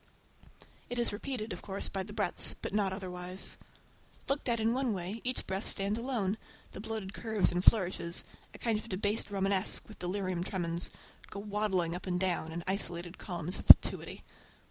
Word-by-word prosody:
It 245 Hz, -, -4 dB
is 235 Hz, -3 st, +2 dB
repeated, 225 Hz, -2 st, -4 dB
of 175 Hz, -, -8 dB
course, 195 Hz, 0 st, -2 dB
by 195 Hz, -, -3 dB
the 200 Hz, +2 st, -7 dB
breadths, 205 Hz, -4 st, +3 dB
but -, -, -5 dB
not 205 Hz, -2 st, +2 dB
otherwise. 185 Hz, -1 st, -4 dB, 0.7 s
Looked 275 Hz, -1 st, -1 dB
at 235 Hz, -1 st, +2 dB
in 225 Hz, +1 st, +2 dB
one 255 Hz, -3 st, 0 dB
way 190 Hz, +4 st, -4 dB
each 255 Hz, 0 st, -2 dB
breadth 190 Hz, +2 st, -3 dB
stands 200 Hz, +2 st, 0 dB
alone, 225 Hz, -5 st, -1 dB, 0.3 s
the -, -, -8 dB
bloated 215 Hz, -3 st, -4 dB
curves 220 Hz, -3 st, 0 dB
and 180 Hz, +1 st, -1 dB
flourishes—a 180 Hz, -5 st, +1 dB
kind 225 Hz, -3 st, 0 dB
of 230 Hz, -, -11 dB
"debased 205 Hz, +3 st, -1 dB
Romanesque" 195 Hz, 0 st, +2 dB
with 215 Hz, -, -13 dB
delirium 185 Hz, -1 st, -2 dB
tremens—go 175 Hz, +1 st, -5 dB
waddling 200 Hz, -4 st, 0 dB
up 180 Hz, +2 st, -6 dB
and 180 Hz, -1 st, 0 dB
down 175 Hz, -3 st, 0 dB
in 170 Hz, +1 st, -5 dB
isolated 175 Hz, -2 st, -1 dB
columns 175 Hz, -2 st, -1 dB
of -, -, -10 dB
fatuity. -, -, +7 dB
195 Hz, 165 wpm, -32 LUFS, 180-220 Hz, 0.7 s, fatuity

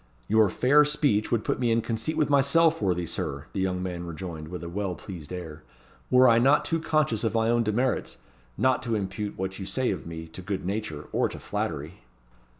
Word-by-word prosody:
"Your 110 Hz, -1 st, +4 dB
fair 140 Hz, +9 st, +5 dB
speech 145 Hz, -8 st, +1 dB
would 115 Hz, -2 st, +1 dB
put -, -, -1 dB
me 120 Hz, -2 st, +1 dB
in 115 Hz, 0 st, +3 dB
conceit 115 Hz, +7 st, -2 dB
with 150 Hz, -, +3 dB
myself, 145 Hz, +3 st, +4 dB
worthy 90 Hz, -3 st, 0 dB
Sir," 70 Hz, -3 st, -4 dB
the 100 Hz, -, -2 dB
young 90 Hz, -1 st, -1 dB
man 90 Hz, -2 st, -4 dB
rejoined 85 Hz, -2 st, -6 dB
with 90 Hz, +1 st, -7 dB
a -, -, -5 dB
well 95 Hz, +1 st, -3 dB
pleased 85 Hz, -5 st, -9 dB
air; 80 Hz, -4 st, -7 dB, 0.5 s
"were 130 Hz, 0 st, +6 dB
I 115 Hz, -1 st, +6 dB
not 135 Hz, +5 st, +4 dB
too 165 Hz, -, 0 dB
conscious 155 Hz, -9 st, +1 dB
of 115 Hz, 0 st, 0 dB
my 115 Hz, 0 st, +2 dB
own 120 Hz, 0 st, +3 dB
demerits, 120 Hz, +4 st, 0 dB, 0.4 s
not 130 Hz, 0 st, +2 dB
to 120 Hz, -3 st, -1 dB
impute 100 Hz, +1 st, -3 dB
what 95 Hz, +1 st, -4 dB
you 95 Hz, -, -5 dB
say 130 Hz, -1 st, 0 dB
of 90 Hz, -4 st, -5 dB
me 80 Hz, 0 st, -6 dB
to 85 Hz, -, -9 dB
good 95 Hz, 0 st, -4 dB
nature, 95 Hz, -7 st, -3 dB
or -, -, +1 dB
to -, -, -8 dB
flattery." -, -, -4 dB
105 Hz, 210 wpm, -27 LUFS, 90-125 Hz, 0.5 s, were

